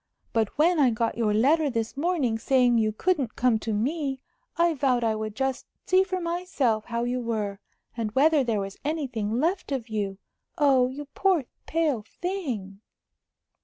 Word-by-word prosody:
But 225 +1 0
when 330 +2 +4
I 270 -3 +5
got 230 0 -1
your 225 -2 +1
letter 285 +8 +3
this 230 -1 -2
morning 280 -7 0
saying 245 -1 +3
you 215 -1 +2
couldn't 275 - 0
come 245 -3 +2
to 225 - -4
me, 270 +5 -1 0.4
I 340 0 +3
vowed 260 -4 +1
I 225 -1 +2
would 215 -1 -4
just 265 0 -2 0.2
see 370 +1 +4
for 370 -1 -3
myself 335 - -1
how 235 0 -2
you 245 +1 -1
were, 210 -4 -2 0.4
and 225 -3 -2
whether 295 +2 +4
there 225 -4 0
was 195 0 -6
anything 250 -8 -2
left 345 +3 0
of 255 -4 -3
you. 200 -3 -2 0.4
Oh, 270 -4 +4
you 285 +3 -7
poor, 370 -8 +2 0.2
pale 310 -8 +1
thing!" 250 - -4
255 Hz, 165 wpm, -26 LUFS, 220-310 Hz, 0.4 s, I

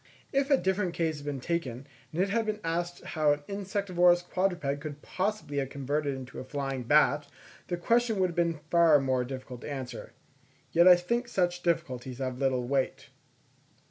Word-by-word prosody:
If 275 +1 +2
a 275 - +6
different 190 -4 0
case 160 -2 0
had 145 0 -9
been 140 -2 -2
taken, 135 -4 -3 0.3
and 160 - -5
it 200 - -2
had 225 0 +1
been 215 0 -1
asked 175 +1 -2
how 155 -2 +2
an 145 0 -6
insectivorous 185 -3 +2
quadruped 175 -6 -1
could 150 -2 -7
possibly 190 -6 -2
have 135 -1 0
been - - -20
converted 140 +1 -1
into 130 -1 -8
a - - -5
flying 135 -1 -4
bat, 145 +1 +4 0.4
the 175 - -2
question 230 +4 +2
would 185 -1 +2
have - - -11
been 170 -3 0
far 170 -3 +6
more 130 -2 +1
difficult 130 -1 -7
to - - -7
answer. 135 -3 -6 0.6
Yet 170 +2 +5
I 180 - +10
think 235 +8 -1
such 175 -5 0
difficulties 130 -8 -2
have 130 -1 -3
little 130 -3 +1
weight. 135 0 -1
160 Hz, 185 wpm, -29 LUFS, 135-180 Hz, 0.6 s, I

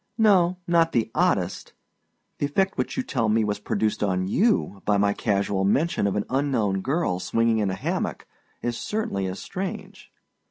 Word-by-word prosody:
No, 185 -5 +4
not 170 -1 +3
the 115 -2 +1
oddest. - - 0 0.7
The 145 - +1
effect 190 +7 0
which - - -3
you 260 - 0
tell 120 - -1
me 110 +1 +3
was 105 -1 -1
produced 105 +1 -1
on 95 -2 0
you 185 - +1
by 105 -1 +2
my 100 0 +2
casual 100 -2 0
mention 135 - +1
of 100 - -1
an 105 - -1
unknown 125 -8 0
girl 135 - 0
swinging 115 +2 +1
in 105 -2 +1
a 95 - -2
hammock - - -3 0.4
is 120 0 -1
certainly 115 - -2
as 95 +1 -4
strange. 190 0 -6
115 Hz, 170 wpm, -25 LUFS, 100-170 Hz, 0.7 s, No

